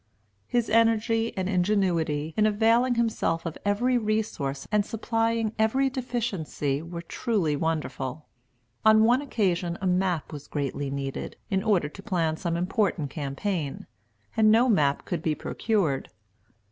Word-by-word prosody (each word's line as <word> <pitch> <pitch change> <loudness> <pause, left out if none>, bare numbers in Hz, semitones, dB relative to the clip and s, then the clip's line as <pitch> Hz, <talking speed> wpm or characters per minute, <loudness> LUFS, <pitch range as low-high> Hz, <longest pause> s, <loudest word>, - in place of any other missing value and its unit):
His 240 -2 +1
energy 225 0 +2
and 185 -1 -1
ingenuity 175 -6 +1
in 215 0 +4
availing 230 +4 +3
himself 220 -8 0
of 165 - -4
every 240 +5 +2
resource 210 -11 -2
and 210 -1 +3
supplying 225 0 -1
every 265 +5 +2
deficiency 200 - -2
were 170 +1 -7
truly 170 -4 0
wonderful. 150 -3 -3 0.6
On 220 0 +6
one 245 +4 +4
occasion 180 -10 0
a 190 - -4
map 180 -4 0
was 145 -1 -8
greatly 140 -1 -3
needed, 135 0 -4 0.2
in 190 -1 +2
order 200 -8 +2
to 175 +6 -11
plan 170 -7 0
some 170 0 -2
important 180 - 0
campaign, 145 +1 -3 0.5
and 220 -2 +5
no 235 +3 +5
map 150 - +2
could 170 -3 -3
be 160 -1 0
procured. 185 - -1
190 Hz, 135 wpm, -26 LUFS, 155-225 Hz, 0.6 s, On